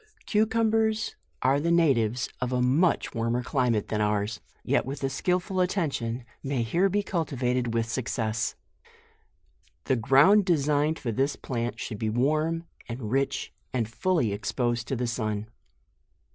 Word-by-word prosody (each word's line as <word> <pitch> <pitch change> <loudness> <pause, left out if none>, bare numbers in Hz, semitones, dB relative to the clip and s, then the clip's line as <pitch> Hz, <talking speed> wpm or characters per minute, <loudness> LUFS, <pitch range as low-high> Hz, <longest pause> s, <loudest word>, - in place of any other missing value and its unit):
CUCUMBERS 220 0 +1 0.3
are 135 +2 +4
the 165 +3 0
natives 130 -8 +3
of 125 0 -1
a 125 - +1
much 140 +7 +2
warmer 115 +1 0
climate 125 -6 0
than 105 -1 0
ours, 105 +1 0 0.2
yet - - +2
with 135 +2 -6
a 135 - 0
skillful 180 +6 0
attention 140 - -1 0.2
may 135 -3 -1
here 175 - +2
be 205 +2 0
cultivated 125 - -1
with 115 0 +1
success. 115 -3 -2 1.3
The 130 - +1
ground 135 - +5
designed 150 -2 +2
for 120 - -3
this 135 +5 0
plant 120 -2 -3
should 105 -4 -5
be 110 - 0
warm, 155 +8 +1 0.3
and 115 -2 -5
rich, 135 +1 -1 0.2
and 120 -4 0
fully 120 - 0
exposed 120 +3 -1
to 135 - -1
the 125 0 -1
sun. 110 -3 -2
130 Hz, 145 wpm, -27 LUFS, 115-165 Hz, 1.3 s, ground